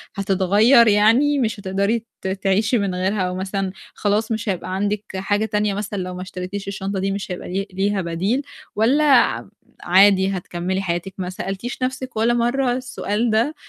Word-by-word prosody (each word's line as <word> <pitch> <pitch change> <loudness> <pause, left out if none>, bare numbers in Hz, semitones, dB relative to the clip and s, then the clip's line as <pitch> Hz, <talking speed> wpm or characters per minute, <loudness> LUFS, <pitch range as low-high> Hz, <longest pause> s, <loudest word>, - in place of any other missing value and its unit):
هتتغيّر 200 +5 +4
يعني 230 +8 +4
مش 225 -3 -1
هتقدري 200 +4 -1 0.2
ت - - -4
تعيشي 195 +4 +1
من 200 -4 -1
غيرها، 190 +2 0
أو 180 0 -1
مثلًا 190 0 -2 0.2
خلاص 215 +3 0
مش 220 0 -2
هيبقى 185 0 -3
عندِك 205 +1 -1
حاجة 205 +3 0
تانية 210 -1 0
مثلًا 205 0 -4
لو 180 - -6
ما 180 - -6
اشتريتيش 185 +2 -6
الشنطة 195 0 -3
دي 195 +1 -1
مش 195 -1 -4
هيبقى 180 - -6
لي 195 +1 -2
ليها 195 +1 0
بديل؟ 185 +10 -1 0.3
والّا 255 +8 +3
عم - - +3 0.3
عادي 190 +1 +5
هتكملي 180 +2 -3
حياتِك؟ 175 +1 -3
ما 180 -1 -3
سألتيش 195 +7 -5
نَفْسِك 260 -2 -3
ولا 230 +2 +3
مَرّة 240 +2 +1
السؤال 240 -3 -2
ده؟ 235 +8 +1
200 Hz, 170 wpm, -21 LUFS, 190-225 Hz, 0.3 s, عادي